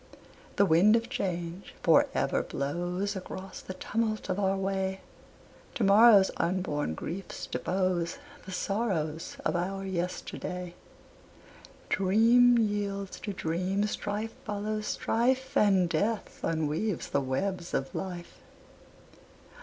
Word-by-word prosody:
The 200 - +5
wind 190 +6 +5
of 230 0 0
change 175 0 -4
for - - +5
ever - - +1
blows 175 +8 -2
Across 190 0 -7
the 185 - -8
tumult 215 0 -2
of 185 +1 0
our 195 -1 +1
way, 190 0 -1 0.7
To 235 - 0
morrow's 200 0 +7
unborn 170 - -1
griefs 180 - -6
depose 180 -2 -1 0.3
The - - -6
sorrows 180 -6 -2
of - - +1
our 195 +3 -2
yesterday. 180 -1 -4 1.1
Dream 230 +5 +5
yields 205 -3 -1
to 205 - -4
dream, 185 +3 -1
strife 210 +1 -3
follows 210 0 -3
strife, 260 +3 0
And 195 -4 +4
Death 205 +7 -1
unweaves 160 +4 -1
the 140 - +1
webs 175 +7 -2
of 135 - -2
Life. 175 -2 -6
190 Hz, 115 wpm, -29 LUFS, 175-210 Hz, 1.1 s, morrow's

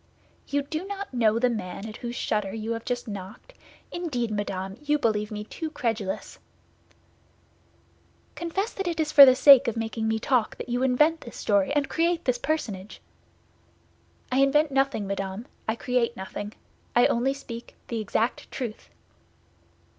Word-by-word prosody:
"You 285 0 0
do 310 +4 -4
not 400 -5 -6
know 225 -3 +3
the 250 +2 +3
man 215 -3 -4
at 215 - -8
whose 240 0 -5
shutter 210 -3 -1
you 220 +1 -4
have 230 0 -4
just 245 0 -3
knocked? 205 - -8 0.4
Indeed, 260 -10 -2
madame, 195 -1 -3
you 295 0 +2
believe 210 -5 0
me 210 -1 -5
too 315 +9 -5
credulous!" 225 -9 -3 1.9
"Confess 380 +6 -3
that 390 -2 -3
it 335 -2 -2
is 310 -1 0
for 280 -3 +11
the 255 - +7
sake 275 0 +8
of 235 - -1
making 225 0 -2
me 220 0 +1
talk 235 0 +1
that - - -7
you 245 +1 0
invent 300 +6 +3
this 235 - -10
story 200 +2 +2
and 290 -2 +1
create 340 +1 0
this 250 -1 +1
personage." 215 -11 -3 1.3
"I 255 - +2
invent 290 +2 +4
nothing, 270 -5 +1
madame; 195 +2 -4 0.2
I 220 - +1
create 240 -1 0
nothing. 205 +2 -6 0.4
I 240 - +6
only 265 +3 +1
speak 235 -4 -9
that 235 - -5
exact 225 +2 -1
truth." 235 -5 -6
240 Hz, 160 wpm, -26 LUFS, 215-280 Hz, 1.9 s, for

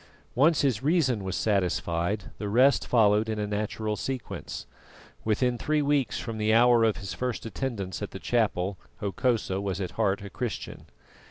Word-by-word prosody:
Once 150 +5 +4
his 130 -6 +1
reason 135 - +2
was 95 -1 -3
satisfied, 90 -1 0
the 105 - -3
rest 130 +6 +4
followed 110 -2 +4
in 110 - -2
a 105 - -1
natural 105 +1 -2
sequence. 130 +2 -5 0.6
Within 120 +3 +1
three 150 -1 +1
weeks 140 -6 +1
from 115 -2 -5
the 110 +1 +3
hour 120 0 +6
of 110 -2 +2
his 100 -3 -5
first 125 -2 -3
attendance 115 -6 -4
at - - -3
the - - -8
chapel 100 -5 0 0.2
Hokosa 105 -1 0
was 100 -1 -2
at 95 -3 -3
heart 100 -2 0
a 100 - -8
Christian. 120 -4 -5
110 Hz, 165 wpm, -27 LUFS, 100-125 Hz, 0.6 s, hour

